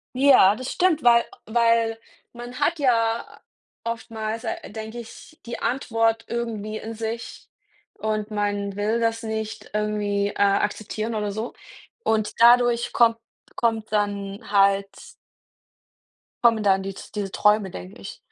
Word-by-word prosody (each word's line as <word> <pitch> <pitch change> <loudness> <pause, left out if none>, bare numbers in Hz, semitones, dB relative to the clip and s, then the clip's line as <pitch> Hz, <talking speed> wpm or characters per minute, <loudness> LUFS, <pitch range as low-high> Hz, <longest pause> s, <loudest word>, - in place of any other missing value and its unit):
Ja, 255 -7 +6
das 255 +2 -5
stimmt, 355 -4 +2
weil 235 -1 +6 0.2
weil 230 0 +2 0.4
man 245 +1 -8
hat 340 - +1
ja 230 -5 0 0.4
oftmals 225 -1 -4
a - - -1 0.2
denke 220 +2 -7
ich, 235 +7 -12
die 235 - -4
Antwort 225 -3 0
irgendwie 220 -3 -3
in 225 +1 -6
sich, 225 +1 -6 0.5
und 215 0 -2
man 205 -1 -2
will 215 +3 0
das 225 0 0
nicht 220 0 -5
irgendwie, 210 -1 0
äh, - - -8
akzeptieren 210 +2 0
oder 210 -1 -1
so 220 +4 -4 0.5
und 215 -1 +1
dadurch 240 0 +5
kommt 230 -1 +4 0.4
kommt 225 -2 -1
dann 200 -1 -2
halt 200 -1 +4 1.6
kommen 225 -2 +5
dann 195 -1 +3
die 195 0 -4 0.2
diese 200 -2 -3
Träume, 210 -2 +2
denke 90 +1 -9
ich. - - -8
220 Hz, 130 wpm, -24 LUFS, 205-235 Hz, 1.6 s, Ja